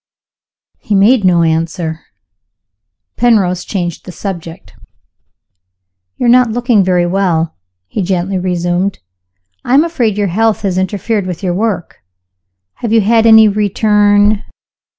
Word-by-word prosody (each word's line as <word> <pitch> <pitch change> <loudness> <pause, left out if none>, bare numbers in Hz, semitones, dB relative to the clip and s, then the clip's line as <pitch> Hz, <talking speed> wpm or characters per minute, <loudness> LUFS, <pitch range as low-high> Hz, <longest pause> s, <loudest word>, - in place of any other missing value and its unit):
He 210 - -2
made 210 +4 +3
no 175 -2 +3
answer. 160 0 -2 1.2
Penrose 190 -7 +1
changed 175 -5 -4
the 185 - -8
subject. 175 -2 -8 1.4
"You - - -2
are - - +2
not 245 0 +4
looking 235 -2 +1
very 180 -1 +1
well," 175 -3 -1 0.3
he 150 - -4
gently 185 +1 -2
resumed. 180 +1 -1 0.7
"I 250 - +1
am 290 - +5
afraid 245 -11 -1
your 205 -2 0
health 220 +4 0
has 185 -2 -1
interfered 200 +1 -2
with 180 0 -6
your 180 -2 -1
work. 195 -3 -3 0.8
Have 230 - -4
you 225 -1 +4
had 225 +2 +2
any 220 -1 +7
return 205 0 +2
195 Hz, 130 wpm, -13 LUFS, 180-220 Hz, 1.4 s, any